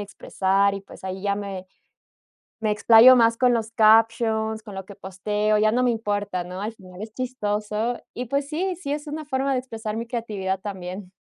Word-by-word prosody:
expresar 200 0 0
y, 195 - -5
pues, 195 - -15
ahí 190 0 -5
ya 200 -1 0
me 195 -2 -6 1.0
me 215 -1 +1
explayo 225 +4 +7
más 230 -1 +4
con 250 0 +3
los 225 -1 -2
captions, 220 0 +3
con 205 - -10
lo 190 - -5
que 200 - -11
posteo, 210 +3 -1
ya 215 0 +3
no 250 +2 +1
me 250 - +3
importa, 205 -4 -2
¿no?, 180 +1 -7
al 215 +2 -4
final, 185 -3 -13
es 215 0 -8
chistoso. 215 -2 -2
Y, 250 - -4
pues 280 +3 -2
sí, 360 +4 -2
sí 330 -5 -5
es 295 +1 -5
una 305 +1 -5
forma 270 -1 -1
de 255 - +1
expresar 225 -4 -6
mi 230 - -3
creatividad 210 -6 -3
también. 190 -1 -7
215 Hz, 200 wpm, -24 LUFS, 200-240 Hz, 1.0 s, explayo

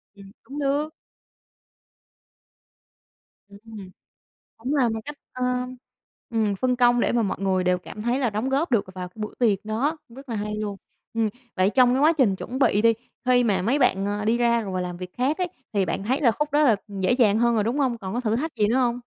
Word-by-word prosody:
Ừm, 195 -1 -14
cũng 280 +2 -8
được. 285 +2 0 2.6
Ừm. 205 -1 -11 0.7
Cũng 255 +6 -3
là 265 -5 +3
một 225 0 -2
cách, 295 0 -7 0.2
ơ, 255 - -6 0.9
ừm, 220 -3 0
phân 250 +4 0
công 245 -1 +4
để - - +1
mà 240 -1 +2
mọi 200 - -1
người 190 -2 +1
đều 180 0 +2
cảm 210 +3 -9
thấy 240 +3 0
là 250 -4 +1
đóng 215 +5 -2
góp 280 +6 0
được 230 -5 +2
vào 180 -1 -5
cái 180 - -34
buổi 210 - -4
tiệc 215 -5 +2
đó. 240 +9 -1 0.2
Rất 275 0 -12
là 230 - -3
hay 210 0 -3
luôn! 210 -1 -3 0.4
Ừm. 225 -1 +1 0.3
Vậy 185 +1 +3
trong 250 +1 +5
cái - - +1
quá 310 +2 +6
trình 255 - +2
chuẩn 250 +6 -5
bị 210 -6 +3
đi, 230 0 +6 0.3
khi 250 -1 +4
mà 195 -5 +1
mấy 240 +9 +1
bạn, 195 -7 +2
ơ, 205 +1 -2
đi 225 +2 +2
ra 235 -1 +3
rồi 200 -4 -5
và 185 - -1
làm 180 -1 -4
việc 180 0 -7
khác 270 +7 0
ấy, 365 -1 0 0.2
thì 200 -3 +2
bạn 190 - -3
thấy 260 +7 0
là 255 -6 +5
khúc 295 +5 -3
đó 295 +1 +4
là 240 -8 +5
dễ 195 +1 0
dàng 225 -4 +3
hơn 235 0 +3
rồi, 215 -2 +1
đúng 235 +6 -1
hông? 255 -5 +1
Còn 190 -2 -6
có 245 - 0
thử 225 -2 0
thách 315 +6 -3
gì 210 -2 +3
nữa 230 +4 +1
hông? 245 -2 +1
230 Hz, 230 wpm, -24 LUFS, 205-255 Hz, 2.6 s, quá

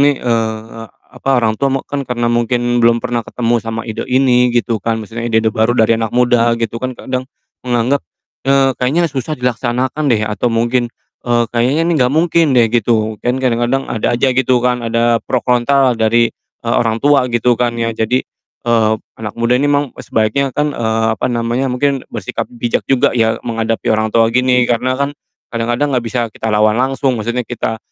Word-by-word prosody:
nih, 145 0 +4
eee, 115 -1 -2 0.3
apa, 135 - -2
orang 115 -3 +2
tua 140 - +2
mek 135 - -2
kan, 145 - -2
karena 120 -1 -2
mungkin 120 +1 +1
belum 115 0 +4
pernah 120 -1 -1
ketemu 120 -1 -1
sama 115 0 -3
ide 110 +1 -4
ini, 125 -1 +3
gitu 120 -1 0
kan, 115 +3 -1
maksudnya 115 +2 -6
ide-ide 110 0 +2
baru 110 +1 +2
dari 115 0 +3
anak 110 - -1
muda 120 -1 +3
gitu 115 0 -3
kan, 130 0 -3
kadang 130 0 -4 0.4
menganggap, 125 +3 +1 0.5
eee, 135 -1 +4
"Kayaknya 145 +8 +2
susah 140 +3 -3
dilaksanakan 125 +4 -1
deh." 115 -5 +2
Atau 105 +3 -1
mungkin, 120 +1 +1 0.4
eee, 120 -1 +2
"Kayaknya 125 +6 +1
ini 170 - +1
enggak 125 +1 +2
mungkin 165 +1 +3
deh." 115 -2 +5
Gitu. 110 -2 +1
Kan 125 +1 +1
kadang-kadang, 125 +1 0
ada 110 - 0
aja 130 - +2
gitu 125 -1 +2
kan, 125 -1 +1
ada 115 0 +1
pro 125 - 0
kontra 130 +1 +3
lah - - -3
dari, 115 +1 +3 0.4
eee, 115 - 0
orang 115 -2 0
tua 140 -3 +3
gitu 120 0 +1
kan 120 -1 0
ya. 115 0 -1
Jadi, 115 +3 0 0.4
eee, 115 -2 +2 0.3
anak 105 -2 -5
muda 115 +1 +1
ini 145 +3 +1
emang 145 -2 +1
sebaiknya 110 +6 0
kan, 150 0 0
eee, 110 -2 0
apa - - -4
namanya, 120 +2 -1
mungkin 135 +1 0
bersikap - - -5
bijak 120 0 -2
juga 135 -2 +3
ya, 115 -2 +1
menghadapi 115 -1 -2
orang 110 0 +1
tua 115 -1 +4
gini, 125 0 +3
karena 125 +2 0
kan 140 +1 -1 0.4
kadang-kadang 120 +5 0
enggak 125 - +1
bisa 120 +1 -1
kita 110 - -3
lawan 105 0 +3
langsung. 130 +2 0
Maksudnya 120 +2 -3
kita 115 -2 -3
120 Hz, 190 wpm, -16 LUFS, 115-130 Hz, 0.5 s, deh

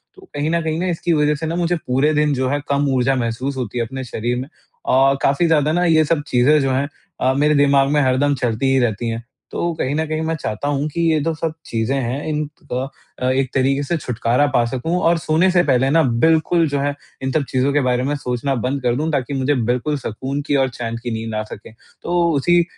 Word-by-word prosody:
तो 385 - -16
कहीं 145 +2 -1
न 170 0 +1
कहीं 160 0 -2
न 185 +1 -1
इसकी 170 0 0
वज़ह 150 0 +2
से 160 +2 -5
न 165 +2 -2
मुझे 175 0 +1
पूरे 135 +5 +2
दिन 150 0 +2
जो 130 -1 0
है 145 +1 0
कम 140 0 +1
ऊर्जा 130 +1 +2
महसूस 125 +3 -2
होती 125 -2 -4
है 115 - 0
अपने 130 +2 -6
शरीर 120 0 -3
में 130 - -4
अ, 135 -2 0
काफ़ी 140 +5 +3
ज़्यादा 155 -2 +2
न 175 +1 +2
ये 155 -1 +4
सब 155 -1 +1
चीज़ें 135 +5 +4
जो 135 -1 0
हैं 135 +2 0 0.3
अ, 130 +1 +3
मेरे 150 +1 +3
दिमाग 140 -1 +4
में 150 - +3
हरदम 140 +2 +2
चलती 120 +2 0
ही 135 - +3
रहती 115 -1 0
हैं। 115 +1 -4 0.3
तो 170 - -1
कहीं 135 - 0
न 160 0 0
कहीं 155 +1 -2
मैं 160 0 -1
चाहता 130 -1 -4
हूँ 145 +1 0
कि 170 +3 -3
ये 155 - +2
तो 165 - 0
सब 160 0 -3
चीज़ें 115 +4 -1
हैं 125 +4 -3
इन 150 0 -1 0.3
अ, 130 0 -4
एक 130 -1 0
तरीके 135 +1 +1
से 170 +4 -1
छुटकारा 125 0 0
पा 120 - +4
सकूँ 130 +9 -2
और 170 0 +4
सोने 160 +4 +2
से 175 -1 +4
पहले 130 -1 +2
न 165 +1 +4 0.2
बिल्कुल 165 +2 +3
जो 140 0 -1
है 145 0 0 0.3
इन 130 - -1
सब 150 0 +1
चीज़ों 130 +2 +1
के 145 - +3
बारे 125 0 +1
में 140 +3 -1
सोचना 135 0 -2
बंद 130 +3 -2
कर 120 -1 +1
दूँ 155 +3 -1
ताकि 140 -1 -1
मुझे 135 +2 +1
बिल्कुल 125 +5 0
सुकून 135 +4 -4
की 145 - +1
और 135 -1 +2
चैन 115 -1 -5
की 120 - -3
नींद 110 0 -4
आ 110 - -1
सके। 110 0 -11 0.3
तो 175 0 +1 0.2
उसी 175 +5 +3
140 Hz, 240 wpm, -20 LUFS, 125-155 Hz, 0.3 s, ये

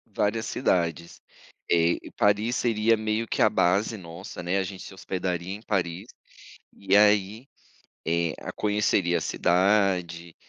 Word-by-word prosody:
Várias 110 +2 0
cidades, 85 -7 -1 0.5
eh, 85 0 +3 0.2
Paris 105 +4 +2
seria 115 -2 +2
meio 110 +1 -2
que - - -2
a - - +6
base 100 +5 +1
nossa, 85 +1 -9
né. 90 +3 0
A 95 - +1
gente 95 0 -8
se - - -10
hospedaria 95 -1 -4
em 105 - -8
Paris, 95 -2 -2 0.7
e 100 0 0
aí, 105 +3 +3 0.6
eh, 85 0 0 0.2
conheceria 105 -4 +1
a - - -4
cidade, 90 -2 +1
95 Hz, 130 wpm, -26 LUFS, 85-105 Hz, 0.7 s, a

